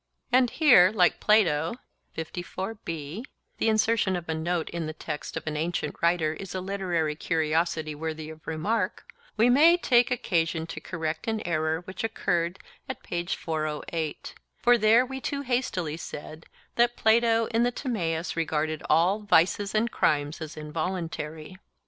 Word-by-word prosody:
And 250 Hz, 0 st, +4 dB
here, 235 Hz, -, +6 dB
like 180 Hz, -5 st, +3 dB
Plato 170 Hz, -5 st, +3 dB, 0.4 s
(the 175 Hz, -, -5 dB
insertion 220 Hz, -3 st, +2 dB
of 175 Hz, -1 st, -5 dB
a 160 Hz, -, -1 dB
note 165 Hz, +1 st, -1 dB
in 170 Hz, -2 st, -3 dB
the 155 Hz, -, -4 dB
text 155 Hz, -1 st, -6 dB
of -, -, -6 dB
an 155 Hz, -1 st, -3 dB
ancient 165 Hz, +3 st, -2 dB
writer 170 Hz, -2 st, +2 dB
is 190 Hz, +3 st, -8 dB
a -, -, -1 dB
literary 180 Hz, -5 st, -1 dB
curiosity 160 Hz, -1 st, 0 dB
worthy 155 Hz, 0 st, -5 dB
of 160 Hz, 0 st, -14 dB
remark), 185 Hz, +5 st, -2 dB, 0.3 s
we 225 Hz, +3 st, +5 dB
may 310 Hz, +8 st, +6 dB
take 245 Hz, -8 st, +3 dB
occasion 165 Hz, -9 st, 0 dB
to 165 Hz, -, -7 dB
correct 160 Hz, -1 st, -4 dB
an 220 Hz, -1 st, 0 dB
error. 160 Hz, 0 st, 0 dB
For 175 Hz, -4 st, -3 dB, 1.3 s
we 265 Hz, +1 st, -6 dB
too 280 Hz, +1 st, -2 dB
hastily 215 Hz, -, -1 dB
said 155 Hz, -1 st, -8 dB, 0.3 s
that 240 Hz, 0 st, +3 dB
Plato 230 Hz, 0 st, +4 dB
in 230 Hz, -, +2 dB
the 245 Hz, +1 st, +2 dB
Timaeus 175 Hz, -, -2 dB
regarded 155 Hz, -1 st, -1 dB
all 175 Hz, +7 st, +4 dB
'vices 200 Hz, +1 st, +2 dB
and 230 Hz, +2 st, +1 dB
crimes 145 Hz, +1 st, 0 dB
as 160 Hz, 0 st, -7 dB
involuntary. 160 Hz, +1 st, -4 dB
175 Hz, 130 wpm, -27 LUFS, 160-220 Hz, 1.3 s, here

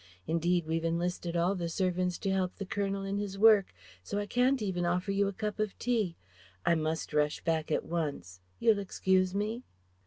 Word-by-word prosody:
Indeed 170 Hz, +1 st, +1 dB
we've 165 Hz, +1 st, -1 dB
enlisted 170 Hz, +1 st, -1 dB
all 175 Hz, +3 st, +2 dB
the 175 Hz, -3 st, -3 dB
servants 180 Hz, 0 st, 0 dB
to 195 Hz, -, -2 dB
help 185 Hz, -1 st, 0 dB
the 200 Hz, -, -5 dB
Colonel 195 Hz, 0 st, -2 dB
in 195 Hz, +1 st, -2 dB
his 200 Hz, -1 st, -4 dB
work, 210 Hz, -2 st, +6 dB, 0.3 s
so 200 Hz, -, -4 dB
I 205 Hz, -, -1 dB
can't 250 Hz, +5 st, +2 dB
even 190 Hz, -5 st, -1 dB
offer 180 Hz, +3 st, 0 dB
you 200 Hz, 0 st, +2 dB
a -, -, -1 dB
cup 210 Hz, +2 st, -4 dB
of 215 Hz, -2 st, -1 dB
tea.... 220 Hz, -8 st, 0 dB, 0.5 s
I -, -, +5 dB
must 160 Hz, -1 st, -2 dB
rush 150 Hz, 0 st, +1 dB
back 160 Hz, -1 st, 0 dB
at -, -, 0 dB
once.... 140 Hz, -, -3 dB, 0.2 s
You'll 220 Hz, -3 st, +4 dB
excuse 185 Hz, -1 st, +1 dB
me?" 215 Hz, +4 st, -1 dB
185 Hz, 190 wpm, -31 LUFS, 170-200 Hz, 0.5 s, work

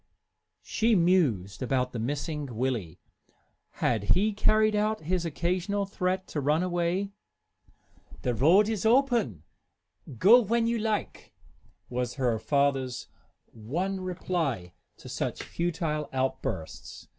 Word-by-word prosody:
She 225 Hz, 0 st, +2 dB
mused 155 Hz, -, +2 dB
about 125 Hz, 0 st, 0 dB
the 120 Hz, -, -5 dB
missing 145 Hz, +4 st, -3 dB
Willie. 115 Hz, -9 st, -2 dB, 0.7 s
Had 105 Hz, -4 st, +1 dB
he 210 Hz, +3 st, +2 dB
carried 215 Hz, +1 st, +3 dB
out 215 Hz, +1 st, 0 dB
his 170 Hz, +2 st, -1 dB
occasional 180 Hz, +5 st, -1 dB
threat 185 Hz, -1 st, -2 dB
to 150 Hz, -, -2 dB
run 150 Hz, +5 st, +2 dB
away? 180 Hz, +2 st, -1 dB, 1.1 s
"The 125 Hz, -, +1 dB
road 170 Hz, -, +5 dB
is 220 Hz, -4 st, -2 dB
open, 230 Hz, -, +2 dB, 0.7 s
go 225 Hz, -, +7 dB
when 230 Hz, +1 st, +1 dB
you 230 Hz, 0 st, 0 dB
like," 215 Hz, -1 st, -3 dB, 0.5 s
was 125 Hz, 0 st, -3 dB
her 125 Hz, -5 st, 0 dB
father's 135 Hz, -2 st, 0 dB, 0.4 s
one 175 Hz, -, -3 dB
reply 165 Hz, -, -2 dB, 0.2 s
to -, -, -13 dB
such -, -, -3 dB
futile 165 Hz, -3 st, -2 dB
outbursts. 130 Hz, 0 st, -4 dB
170 Hz, 115 wpm, -28 LUFS, 130-200 Hz, 1.1 s, go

